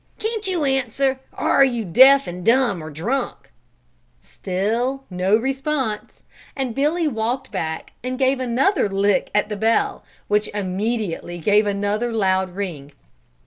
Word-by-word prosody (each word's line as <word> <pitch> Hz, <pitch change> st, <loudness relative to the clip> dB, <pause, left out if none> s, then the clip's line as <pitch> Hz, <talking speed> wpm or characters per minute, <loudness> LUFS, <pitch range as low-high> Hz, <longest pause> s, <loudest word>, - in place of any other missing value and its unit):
Can't 440 Hz, -2 st, -3 dB
you 350 Hz, -5 st, 0 dB
answer, 265 Hz, 0 st, 0 dB
or -, -, -1 dB
are 275 Hz, -, +6 dB
you 240 Hz, -5 st, 0 dB
deaf 265 Hz, +9 st, +6 dB
and 180 Hz, +1 st, -7 dB
dumb, 230 Hz, -6 st, +2 dB
or 155 Hz, -, -7 dB
drunk?" 200 Hz, -, -3 dB, 0.7 s
Still 230 Hz, +8 st, -2 dB
no 185 Hz, +3 st, +2 dB
response, 265 Hz, -2 st, -2 dB, 0.3 s
and 265 Hz, -4 st, -2 dB
Billy 305 Hz, +6 st, +1 dB
walked 245 Hz, +1 st, -2 dB
back 160 Hz, 0 st, -4 dB
and 255 Hz, 0 st, -3 dB
gave 265 Hz, 0 st, +2 dB
another 255 Hz, -, +1 dB
lick 200 Hz, 0 st, +1 dB
at 210 Hz, -, +2 dB
the 210 Hz, -, -4 dB
bell, 225 Hz, +3 st, +1 dB, 0.2 s
which 210 Hz, 0 st, +1 dB
immediately 195 Hz, -2 st, -2 dB
gave 205 Hz, +5 st, +3 dB
another 205 Hz, +4 st, -1 dB
loud 190 Hz, -4 st, 0 dB
ring. 155 Hz, -8 st, -5 dB
225 Hz, 140 wpm, -21 LUFS, 195-265 Hz, 0.7 s, are